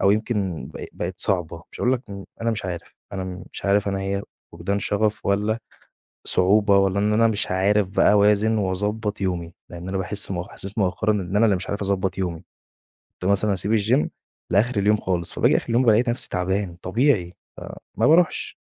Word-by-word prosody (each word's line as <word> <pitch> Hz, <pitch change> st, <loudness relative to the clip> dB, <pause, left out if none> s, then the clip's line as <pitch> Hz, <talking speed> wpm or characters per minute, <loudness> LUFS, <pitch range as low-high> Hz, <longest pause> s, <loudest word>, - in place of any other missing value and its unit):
أو 100 Hz, -, +5 dB
يمكن 100 Hz, -5 st, -1 dB
ب -, -, -6 dB
بَقت 90 Hz, +1 st, -5 dB
صعبة، 85 Hz, -4 st, 0 dB
مش -, -, -10 dB
هأقول 125 Hz, -, +2 dB
لك 130 Hz, 0 st, -1 dB
امم، 100 Hz, -1 st, -7 dB, 0.2 s
أنا 115 Hz, -, 0 dB
مش 110 Hz, -4 st, -3 dB
عارف! 85 Hz, -2 st, -6 dB, 0.2 s
أنا 95 Hz, -1 st, -3 dB
م 90 Hz, -1 st, -7 dB
مش -, -, -8 dB
عارف 100 Hz, +1 st, +2 dB
أنا 95 Hz, 0 st, -2 dB
هي 100 Hz, +1 st, -2 dB, 0.3 s
فُقدان 90 Hz, +5 st, -2 dB
شَغف 105 Hz, +1 st, -1 dB
والّا 105 Hz, +3 st, +1 dB, 0.7 s
صعوبة 100 Hz, +2 st, +5 dB
والّا 95 Hz, 0 st, +2 dB
إن 105 Hz, +1 st, +1 dB
أنا 115 Hz, +1 st, +4 dB
مش 105 Hz, -4 st, 0 dB
عارف 95 Hz, +1 st, +2 dB
بقى -, -, +5 dB
أوازن 105 Hz, +2 st, +3 dB
وأضبط 105 Hz, +2 st, -2 dB
يومي، 85 Hz, -3 st, -2 dB, 0.2 s
لأن 90 Hz, +1 st, -7 dB
أنا 95 Hz, -, -2 dB
باحِسّ 100 Hz, +1 st, 0 dB
مؤخ 90 Hz, +1 st, -4 dB
إحساس 100 Hz, +3 st, -8 dB
مؤخرًا 100 Hz, +2 st, +1 dB
إن 100 Hz, -2 st, -2 dB
أنا 110 Hz, -, +5 dB
اللي 105 Hz, -3 st, +3 dB
مش 90 Hz, -, -5 dB
عارف 100 Hz, 0 st, -3 dB
أضبط 95 Hz, -1 st, -1 dB
يومي، 90 Hz, -2 st, -3 dB, 0.8 s
كُنت 95 Hz, +2 st, +1 dB
مثلًا 100 Hz, +1 st, +2 dB
أسيب 105 Hz, +4 st, +1 dB
الGym 115 Hz, +7 st, +2 dB, 0.4 s
لآخر 105 Hz, +4 st, +2 dB
اليوم 105 Hz, +2 st, +3 dB
خالص، 90 Hz, -4 st, -1 dB
فباجي -, -, +3 dB
آخر -, -, -5 dB
اليوم 120 Hz, +3 st, +3 dB
بالاقي 115 Hz, +1 st, +5 dB
نفسي 120 Hz, +1 st, -1 dB
تعبان، 95 Hz, 0 st, -2 dB
طبيعي، 100 Hz, -4 st, +1 dB, 0.2 s
فما 115 Hz, -, -3 dB
باروحش. 165 Hz, +2 st, +2 dB
100 Hz, 190 wpm, -23 LUFS, 95-105 Hz, 0.8 s, أو